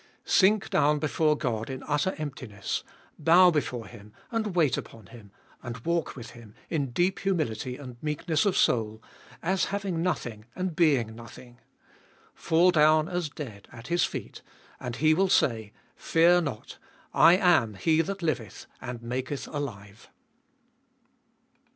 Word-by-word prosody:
Sink 200 +2 +3
down 150 +1 +3
before 155 0 +1
God 115 -5 -2
in 130 -1 -6
utter 150 +6 0
emptiness; 130 -9 -5 0.4
bow 175 +4 +6
before 125 -7 -2
Him 105 +1 -14 0.2
and 220 -5 -2
wait 155 -7 +3
upon 110 -3 -8
Him, 105 +2 -14 0.3
and 120 -2 -6
walk 170 -1 -1
with 120 -3 -9
Him, 115 -3 -14 0.2
in 145 -5 -1
deep 175 +10 0
humility 145 - -2
and 125 -4 -11
meekness 155 +3 0
of 195 - +1
soul, 110 -1 +1 0.4
as 190 +2 +1
having 195 -4 -3
nothing 120 -11 -3
and 185 -3 -3
being 140 -10 +2
nothing; 120 +1 -13 0.7
fall 170 +3 +3
down 155 -1 +4
as 175 -3 -2
dead 115 -10 -9
at 115 +3 -11
His 175 0 +2
feet, - - -5 0.4
and 125 -1 -5
He 155 +4 +3
will 190 +4 +2
say: 110 - +1 0.2
Fear 175 +2 +4
not, 140 -10 -6 0.3
I 175 +2 +7
am 175 - +3
He 160 - +2
that 195 +2 -5
liveth, 125 - -3 0.2
and 120 -1 -7
maketh 130 +3 -4
alive. 110 -8 -7
150 Hz, 145 wpm, -27 LUFS, 120-170 Hz, 0.7 s, I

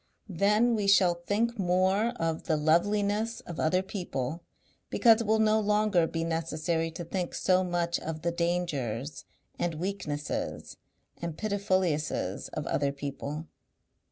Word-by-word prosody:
Then 210 +6 +3
we 210 -3 0
shall 190 -3 +5
think 210 +7 -1
more 190 +4 +2
of 165 -1 -1
the 155 - +1
loveliness 205 +8 +1
of 170 - -8
other 180 +4 +2
people 170 -6 -4 0.5
because 230 -2 +5
it 225 - -3
will 220 +1 +4
no 220 0 +4
longer 210 -5 +2
be 165 0 -2
necessary 165 0 -1
to 165 +2 -6
think 175 +1 -3
so 185 0 +3
much 175 -1 0
of 155 -1 -5
the 170 - +1
dangers 150 -7 -2 0.3
and 170 -2 -1
weaknesses 155 -4 -4 0.4
and 170 -2 -4
pitifulliesses 190 -7 -1
of - - -5
other 140 -1 0
people. 140 +2 -5
175 Hz, 135 wpm, -29 LUFS, 160-200 Hz, 0.5 s, shall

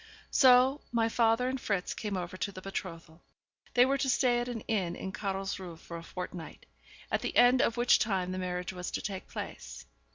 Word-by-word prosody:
So 260 +2 +6
my 230 -1 +2
father 230 +2 +2
and 260 0 -2
Fritz 195 -4 -1
came 205 -3 -3
over 175 0 -5
to 185 +2 -3
the 185 - -9
betrothal. 175 -4 -7 0.5
They 245 0 +7
were 275 +1 +1
to 270 - 0
stay 245 -1 +3
at 240 - -2
an 240 -3 -4
inn 190 -7 -1
in 190 - -5
Carlsruhe 195 -3 -4
for 170 - -10
a - - -8
fortnight, 180 -2 -7 0.5
at - - +1
the - - -2
end 245 +1 +6
of 230 -3 +1
which 240 0 +5
time 190 -4 0
the 185 - -3
marriage 180 0 -3
was 180 -1 -5
to - - -3
take 195 -2 -5
place. - - -7
200 Hz, 200 wpm, -30 LUFS, 180-245 Hz, 0.5 s, They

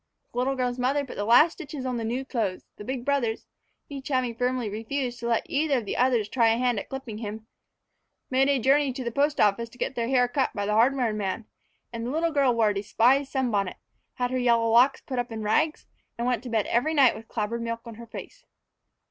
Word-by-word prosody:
The 245 - -3
little 270 +2 +1
girl's 250 -1 -2
mother 275 +3 +1
put - - -9
the 205 - -2
last 245 +9 +6
stitches 280 -2 -7
on 250 -1 -2
the 230 - -3
new 245 +4 -2
clothes; 220 -8 -2
the - - -8
big 255 +2 -4
brothers, 260 -6 0 0.4
each 275 -2 -7
having 255 -4 0
firmly 250 0 -1
refused 240 +4 -3
to 235 - -4
let 230 -1 +1
either 285 -1 +1
of 235 - -3
the - - -3
others 245 -4 +2
try 230 +1 +2
a 225 0 +3
hand 245 -3 +1
at - - -9
clipping 265 -5 -6
him, 220 0 -6 0.9
made 265 +2 +3
a 280 - +3
journey 270 +2 +3
to 260 0 -5
the 235 - -3
post 290 +4 +1
office 215 +3 +2
to 245 - -18
get - - -2
their 235 -2 -2
hair 250 -1 +3
cut 260 +2 0
by 205 -1 -2
the 210 - 0
hardware 240 +1 +3
man; 210 +1 -3 0.5
and 230 0 -4
the 240 - -3
little 330 +3 0
girl 280 -4 +3
wore 230 -2 +3
a - - -2
despised 245 +7 +2
sunbonnet, 215 -8 0 0.4
had 245 0 -1
her 255 - 0
yellow 235 -2 +3
locks 250 +4 +5
put 255 -3 -4
up 245 -1 -3
on 220 -1 -5
rags, 305 +9 +1 0.3
and 235 - -2
went 245 -3 0
to 250 - -8
bed 220 -3 +1
every 305 +7 +1
night 270 -4 +5
with 225 +1 -11
clabbered 230 +1 -3
milk 230 0 -3
on 230 - -8
her 230 +1 -11
face. - - -10
245 Hz, 235 wpm, -26 LUFS, 225-265 Hz, 0.9 s, last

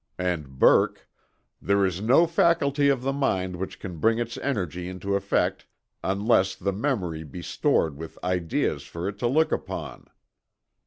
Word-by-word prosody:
And 85 -7 -3
Burke: - - +4 0.5
"There 100 0 +2
is 95 0 -2
no 130 +10 +5
faculty 150 -4 +2
of 135 -3 +1
the 135 +1 0
mind 95 -10 0
which 95 +2 -6
can 90 -3 -7
bring 115 +7 +3
its 120 0 -3
energy 90 - -3
into 95 +2 -4
effect 100 0 0 0.4
unless 100 -1 +2
the 100 - -2
memory 95 - -2
be 75 -5 -9
stored 80 -3 +1
with 80 +1 -9
ideas 90 -2 0
for 85 +2 -6
it 100 0 -5
to 120 - +1
look 155 +6 +2
upon." - - -5
100 Hz, 155 wpm, -26 LUFS, 90-125 Hz, 0.5 s, no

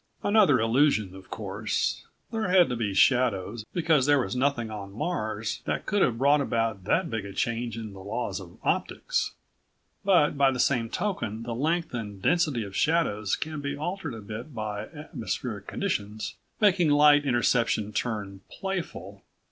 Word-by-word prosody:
Another 205 - +5
illusion, 115 -4 +2
of 95 -1 -13
course. - - -2 0.2
There 225 -3 -1
had 180 -3 +5
to 125 - -1
be 105 -4 -2
shadows, 110 -3 +2
because 160 -6 +2
there 145 0 +5
was - - -4
nothing 125 -4 0
on 100 -2 -7
Mars 110 - -3
that - - -2
could 205 0 +1
have 120 -8 +2
brought 140 +3 +4
about 115 -7 -1
that 170 - +2
big 110 -2 -2
a 100 -1 -8
change 120 +1 -2
in 110 -3 -6
the 95 - -11
laws 100 0 -3
of 90 -2 -12
optics. - - -1 0.7
But 180 -7 +4
by 140 -1 +6
the 130 -1 -2
same 120 -4 +2
token 115 - -2
the 115 0 -4
length 160 +6 0
and 105 -4 -5
density 150 - +2
of 100 -1 -8
shadows 110 - +1
can 155 -2 -5
be 140 0 -3
altered 160 -3 -4
a 110 - -8
bit 115 +7 -8
by 105 -1 -4
atmospheric 115 - -5
conditions, 105 - -3 0.3
making 185 -6 +4
light 145 0 +6
interception 120 -4 +1
turn 105 -4 -3
playful. 165 - -5
120 Hz, 165 wpm, -27 LUFS, 105-150 Hz, 0.7 s, by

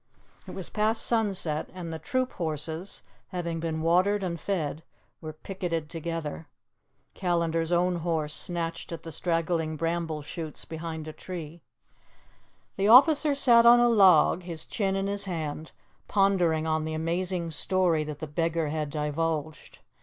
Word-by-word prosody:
It - - -8
was 190 - -6
past 220 +1 +1
sunset, 195 -9 0
and 170 -3 -6
the 160 - -5
troop 255 - -1
horses, 160 +2 -4 0.2
having 170 -3 -3
been 160 -1 -3
watered 185 +5 +3
and 170 -2 -3
fed, 160 -4 -2 0.4
were 155 -1 -6
picketed 165 -1 -4
together. 165 -2 -5 0.7
Callandar's 170 -2 0
own 175 0 +2
horse 160 -3 -1
snatched 165 +2 -4
at 165 -1 -6
the 165 - -7
straggling 165 0 -1
bramble 165 -1 -2
shoots 155 +1 -7
behind 160 -1 -6
a 155 - -6
tree. 170 -2 -8 1.2
The 195 +1 +2
officer 290 +5 +7
sat 235 -4 +6
on 240 0 +9
a 240 0 +5
log, 185 -6 +5
his 170 -3 -6
chin 195 -3 -1
in 195 0 -1
his 200 0 -1
hand, 160 -4 -4 0.4
pondering 180 -6 +2
on 155 -1 0
the 155 0 -3
amazing 170 +1 -2
story 170 -1 +1
that 150 -1 -6
the 155 - -5
beggar 165 +1 -1
had 150 -1 -2
divulged. 150 +1 -3
165 Hz, 145 wpm, -27 LUFS, 160-185 Hz, 1.2 s, on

